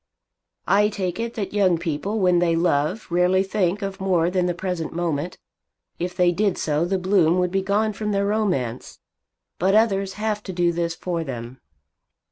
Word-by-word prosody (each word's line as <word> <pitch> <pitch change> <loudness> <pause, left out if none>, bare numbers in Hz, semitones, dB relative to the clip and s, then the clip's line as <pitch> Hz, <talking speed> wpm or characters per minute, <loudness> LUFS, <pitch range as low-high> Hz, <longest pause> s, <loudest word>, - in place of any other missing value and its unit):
"I 210 +1 +4
take 185 -2 -3
it 230 0 -3
that 205 -3 -4
young 190 -4 +3
people 170 +6 -3
when 180 -3 +3
they 170 -1 +2
love 165 +3 +1
rarely 180 +2 +3
think 195 0 -1
of 195 -1 -4
more 180 -3 +2
than 180 -1 +1
the 175 - -1
present 180 -3 -3
moment. 170 -1 -2 0.6
If 175 +1 -4
they 180 -1 +4
did 195 +2 0
so 150 +1 0
the 190 +2 0
bloom 180 -2 +3
would 180 -1 +1
be 195 +1 +1
gone 210 +3 0
from 210 +1 -3
their 200 0 +1
romance. 185 - -1 0.6
But 190 +3 +3
others 195 -3 +2
have 210 -1 -2
to 190 - -5
do 175 -1 +2
this 170 -1 -2
for 170 -1 -3
them. 125 -2 -7
180 Hz, 180 wpm, -23 LUFS, 170-200 Hz, 0.6 s, I